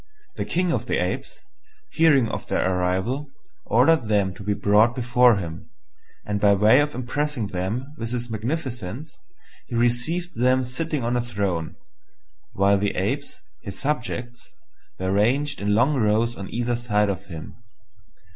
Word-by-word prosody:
The - - -3
King 180 0 0
of - - -2
the - - +1
Apes, - - -3 0.5
hearing 145 -7 +4
of - - -5
their 95 - +1
arrival, 95 +11 -1 0.4
ordered 160 -8 +4
them 100 -3 +1
to 95 - -12
be 100 +1 -1
brought 105 +4 +3
before 125 -1 +4
him; 85 -3 -6 0.6
and 105 -1 -2
by 100 -1 +5
way 105 +6 +5
of 145 0 0
impressing 130 -2 -2
them 105 +10 -3
with 115 0 -3
his 120 -1 -3
magnificence, 120 - -4 0.5
he 120 - -5
received 120 +10 0
them 130 +1 +3
sitting 145 +2 -3
on 120 +1 0
a 120 - +1
throne, 100 -8 -3 0.8
while 100 0 +3
the 100 0 -1
Apes, 135 +10 -2 0.2
his 100 -3 -5
subjects, 125 -4 -3 0.5
were 95 0 -2
ranged 130 +9 +1
in 105 0 +1
long 125 +7 +3
rows 115 -1 +1
on 100 -3 -7
either 120 +1 -1
side 105 -3 +1
of 100 +1 -7
him. 80 -5 -8
120 Hz, 155 wpm, -24 LUFS, 100-130 Hz, 0.8 s, by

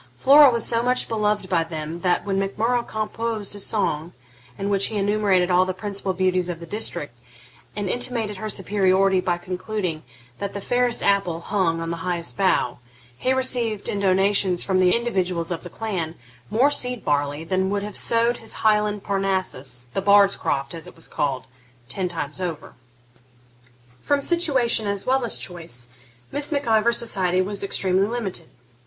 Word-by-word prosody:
Flora 285 +1 +7
was 235 -2 0
so 230 -1 +2
much 250 +1 +1
beloved 210 -3 0
by 170 -3 +2
them 160 0 -6
that, 180 +1 +1
when 195 -1 0
Mac 195 0 -3
Murrough 240 +3 +2
composed 220 -1 -3
a - - -6
song 175 -6 -1 0.4
in 195 - -3
which 200 0 +2
he 215 - -4
enumerated 200 -3 +2
all 180 +1 +5
the 185 0 -3
principal 200 -1 -3
beauties 185 -1 +1
of 170 -2 -4
the 170 - -8
district, 165 - -3 0.6
and 205 -1 -3
intimated 225 -2 +1
her 215 +3 -4
superiority 190 -1 +2
by 175 -1 0
concluding, 180 -2 -4 0.4
that 200 0 -4
'the 200 - -5
fairest 245 +2 0
apple 195 -4 +1
hung 170 -2 0
on 165 0 -3
the 170 - -3
highest 170 0 -3
bough,' 185 -11 +1 0.4
he 255 - -1
received, 245 -5 0
in 205 - -2
donatives 190 -1 +2
from 190 -1 +1
the 180 -1 +4
individuals 185 -8 -1
of 170 - -3
the 175 - -9
clan, 175 -6 -4 0.3
more 260 +6 +3
seed 250 -4 +1
barley 145 +1 0
than 190 +2 0
would 200 0 -1
have 210 -1 -7
sowed 235 +1 +2
his 225 - -7
Highland 210 -1 +2
Parnassus, 185 -11 -1
the 195 - -1
bard's 200 0 +5
croft, 135 +1 -2
as 165 -2 -8
it - - -13
was 165 - -8
called, 135 -3 -2 0.4
ten 185 +5 -2
times 165 -1 -4
over. 170 -4 -5 1.3
From 285 -1 0
situation 270 - +1
as 200 -1 -2
well 265 0 +2
as 235 - +1
choice, 165 -10 -5 0.4
Miss 290 +1 0
Mac 285 -1 -1
Ivor's 225 +1 +3
society 185 -6 +1
was 200 +1 -2
extremely 195 0 +2
limited. 210 -8 -2
195 Hz, 175 wpm, -23 LUFS, 180-220 Hz, 1.3 s, Flora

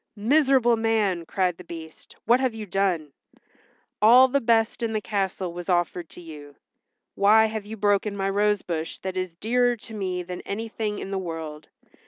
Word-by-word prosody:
"Miserable 255 +1 +3
man!" 210 -7 0
cried 180 -3 0
the 180 - -11
Beast, 165 -2 -11
"what 240 +3 +4
have 260 -4 0
you 220 -1 -6
done? 180 -7 -1 0.9
All 245 +5 +8
the 280 +2 0
best 230 0 +2
in 230 -1 -1
the 215 - 0
castle 195 -4 -2
was 175 +1 -7
offered 175 -1 0
to - - -12
you. 150 -4 -11 0.6
Why 215 +2 +5
have 220 -2 -4
you 220 +1 -7
broken 205 0 +1
my 195 0 -1
rose 205 0 +1
bush 165 -2 -4
that 190 0 -4
is 185 -2 -3
dearer 245 +5 +1
to 225 0 -12
me 185 -4 -3
than 180 0 -7
anything 215 0 -4
in 195 - -6
the 195 - -1
world? 160 -4 -7
200 Hz, 180 wpm, -25 LUFS, 175-225 Hz, 0.9 s, All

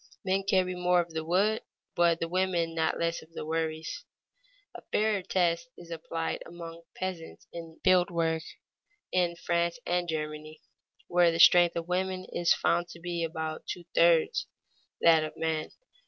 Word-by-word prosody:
Men 190 +1 +2
carry 185 -2 +2
more 180 0 +2
of 170 -1 -2
the 160 0 -2
wood, 195 +6 +2 0.3
but 170 -1 +3
the 165 - -1
women 175 -2 0
not 160 -1 0
less 170 0 -1
of 160 +1 -18
the 155 - -6
worries. 160 0 -3 0.7
A - - -9
fairer 215 -2 +2
test 180 +3 0
is 170 -1 -12
applied 165 0 -3
among 170 -1 -9
peasants 185 -3 -6
in 165 -1 -9
field 185 -1 +4
work 165 -1 0 0.7
in 175 -2 +1
France 170 +1 0
and 175 0 0
Germany, 155 0 -4 0.5
where 175 -1 +4
the 165 - -3
strength 175 0 +7
of 170 0 -3
women 185 +1 -1
is 175 0 +1
found 175 +1 +2
to 170 - -12
be 170 0 -3
about 160 -1 -4
two 175 - -5
thirds 165 -1 +3 0.5
that 165 -2 +6
of 155 - -6
men. 160 -1 -1
170 Hz, 160 wpm, -29 LUFS, 165-180 Hz, 0.7 s, strength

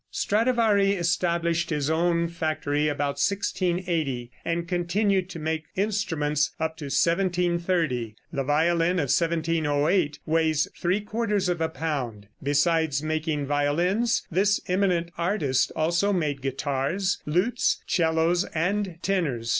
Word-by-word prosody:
] - - -48
Stradivari 215 -3 +2
established 170 -1 0
his 150 -3 -1
own 170 +1 +1
factory 155 -3 -1
about 145 -1 -1
1680, 175 -9 -1
and 170 0 -2
continued 185 +2 0
to 185 - -7
make 160 0 -2
instruments 165 -8 0
up 160 0 -1
to 150 - -7
1730. 170 - 0 0.2
The 140 -2 -1
violin 165 +4 +2
of 140 -5 +1
1708 160 -1 +1
weighs 160 -1 +2
three 185 +4 0
quarters 210 -3 -1
of 175 -2 -1
a 160 - +1
pound. 130 -10 -4
Besides 145 +1 +1
making 155 -2 -1
violins, 170 - +1
this 200 +4 +2
eminent 180 -2 +1
artist 170 -8 +1
also 170 +5 +1
made 150 -7 -1
guitars, 140 +7 -1
lutes, 180 +10 +1
'cellos 165 +1 +2
and 190 +2 0
tenors. 145 -12 -1
165 Hz, 120 wpm, -26 LUFS, 150-180 Hz, 0.2 s, Stradivari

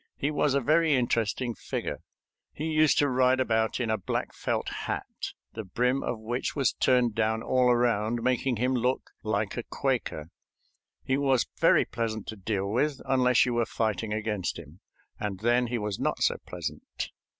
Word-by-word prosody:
He 140 - 0
was 145 -2 +1
a 140 - +2
very 155 +3 +3
interesting 120 0 0
figure. - - -4 0.5
He 155 - -5
used 155 -1 +4
to 145 - +4
ride 130 0 +3
about 110 -3 +1
in 115 -3 0
a 110 - 0
black - - -3
felt - - -2
hat, - - -3 0.5
the 110 - -5
brim 125 +7 0
of 120 - -2
which 115 +3 -3
was 140 -3 +2
turned 125 -3 +3
down 110 0 0
all 125 -1 +3
around, 120 -1 +2
making 130 0 +1
him 125 +4 +1
look 125 +1 0
like - - -1
a - - -2
Quaker. 75 +1 -2 0.7
He 130 - +1
was 135 -3 +3
very - - +5
pleasant 110 -3 -3
to 110 - -5
deal 100 -1 -2
with, 135 +7 0
unless 125 -2 +4
you 125 - -1
were 120 -1 +1
fighting 110 -1 -1
against 105 -3 -2
him, 85 +1 -12 0.4
and 100 -2 -4
then 120 +2 +3
he 120 +1 -1
was 105 -3 -3
not - - 0
so - - +2
pleasant. - - -5
120 Hz, 175 wpm, -28 LUFS, 110-130 Hz, 0.7 s, very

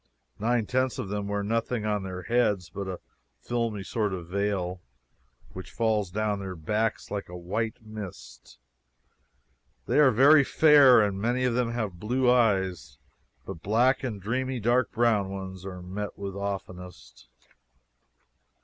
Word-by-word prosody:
Nine 115 +1 +1
tenths 130 +2 0
of 120 -7 -4
them 100 0 -3
wear 100 0 -2
nothing 115 +1 -1
on 105 -1 0
their 90 -1 -6
heads 105 -6 +1
but 100 -1 -5
a 95 -2 -5 0.4
filmy 115 -4 -2
sort 105 -1 -2
of 85 -2 -9
veil, 95 -2 -2 0.7
which 95 - -8
falls 110 -4 0
down 105 +2 -1
their 95 -2 -6
backs 105 +7 -2
like 100 -3 -4
a 90 - -7
white 105 +7 -3
mist. 90 - -10 1.3
They - - +2
are 145 -3 +7
very 140 +5 +6
fair, 140 -5 +6
and 100 -2 -1
many 120 +3 0
of 125 -2 +1
them 120 -1 0
have 105 -7 -3
blue 125 +5 +2
eyes, 95 - +1 0.5
but 80 - -8
black 120 +8 +2
and 115 -6 -3
dreamy 130 +5 -2
dark 120 +1 +1
brown 110 -4 +2
ones 95 -1 -7
are 90 -2 -8
met 100 +3 -6
with 100 -1 -5
oftenest. 90 -10 -7
105 Hz, 150 wpm, -27 LUFS, 95-120 Hz, 1.3 s, are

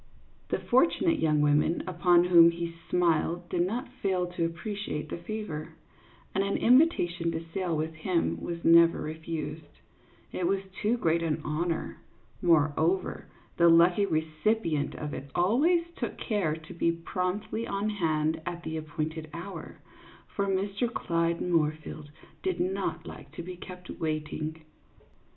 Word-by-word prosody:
The - - +1
fortunate 330 +5 +2
young 150 -2 +2
women 150 +3 +2
upon 175 -1 +4
whom 170 -2 +7
he 170 0 -4 0.2
smiled 175 0 +1
did 175 - 0
not 225 +9 -1
fail 185 -2 +1
to 175 -1 -2
appreciate 170 -3 -4
the - - -4
favor, 170 -5 -6 0.6
and 195 - +1
an 200 0 0
invitation 190 - +3
to 165 +1 -4
sail 180 -4 -1
with 160 +1 -2
him 165 +2 -1
was 170 -1 -5
never 170 0 +6
refused, 155 -1 -6 0.5
it 180 - -1
was 195 +1 +1 0.2
too 220 +3 +2
great 170 -6 +1
an 160 -2 0
honor; 160 +2 -2 0.4
morever, 165 +2 +2 0.3
the 170 0 +6
lucky 175 +4 +5
recipi 160 +5 0
ent 145 -1 -1
of 150 -1 -5
it 140 +1 -7
always 290 - +3
took - - -4
care 195 -9 0
to 160 -1 -11
be 170 0 +1
promptly 185 +6 -3
on 200 +2 -1
hand 160 -5 0
at 175 0 -5
the 160 0 -4
appointed 155 +1 -4
hour, 175 +4 -8 0.5
for 200 -1 -2
Mr. 200 +4 0
Clyde 170 -5 0
Moorfield 155 -3 -1 0.3
did 375 -2 -1
not 370 +2 -2
like - - -10
to - - -6
be 180 +1 -7
kept 180 0 -10
waiting. 155 0 -3
170 Hz, 145 wpm, -29 LUFS, 160-195 Hz, 0.6 s, whom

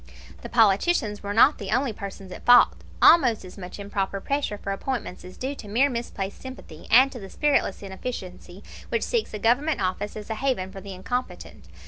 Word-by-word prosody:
The - - -8
politicians 220 - +2
were 200 - -4
not 235 +8 +5
the 200 -3 -6
only 250 +1 +1
persons 195 -2 -8
at - - -9
fault; 245 0 +7 0.3
almost 250 - +6
as 180 - -11
much 180 -3 -9
improper 200 -1 -3
pressure 275 -2 -2
for 200 - -5
appointments 215 -2 -4
is 180 0 -12
due 265 +2 -3
to 230 - -10
mere 255 +7 +2
misplaced 215 -5 -5
sympathy, 260 -12 -10
and 260 +4 +6
to 250 - -8
the 195 -2 -9
spiritless 285 -9 0
inefficiency 190 -2 -7 0.3
which 460 - 0
seeks 470 -3 -1
a - - -4
Government 250 +9 +1
office 190 +3 -2
as 215 +1 -7
a - - -1
haven 245 -9 -1
for 195 -1 -9
the 195 -1 -8
incompetent. 245 +7 -5
210 Hz, 190 wpm, -25 LUFS, 195-260 Hz, 0.3 s, fault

